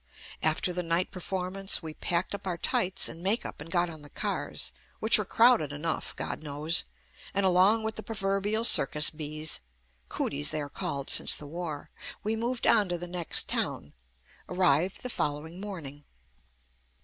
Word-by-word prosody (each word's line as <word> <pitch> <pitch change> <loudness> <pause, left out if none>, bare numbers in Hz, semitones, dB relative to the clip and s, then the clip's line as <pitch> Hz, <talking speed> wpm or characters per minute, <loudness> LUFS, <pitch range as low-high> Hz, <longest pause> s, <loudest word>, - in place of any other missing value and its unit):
After 160 +3 +1
the 180 - -1
night 170 +1 0
perform 185 0 -4
ance, 195 -2 +3
we 160 -1 -6
packed 175 +4 -1
up 200 -1 -6
our 175 -2 -1
tights 185 +2 +1
and 165 - -8
makeup 200 -2 -1
and 155 - -9
got 175 0 +2
on 160 -3 -9
the 145 - -13
cars, - - -3 0.3
which 220 0 +5
were 210 - -1
crowded 225 - +4
enough, 155 +3 -3
God - - -4
knows, 150 +2 0 0.5
and 200 0 +3
along 190 +5 +4
with 220 0 -2
the - - -3
proverbial 205 0 -1
cir 185 - +6
cus 150 0 +1
bees 155 0 -5 0.5
(cooties 75 +1 -1
they 155 - -2
are 145 - -5
called 140 0 0
since - - +5
the 150 - -6
war) 160 -1 -6 0.3
we 215 +2 0
moved 235 +2 -2
on 205 -3 +5
to 175 - -1
the 175 - -6
next 175 -1 +3
town, 70 - -2 0.6
arrived 180 0 +2
the 250 - -3
fol 145 - 0
lowing 160 +5 -9
morning. 155 -8 -7
175 Hz, 175 wpm, -29 LUFS, 155-195 Hz, 0.6 s, cir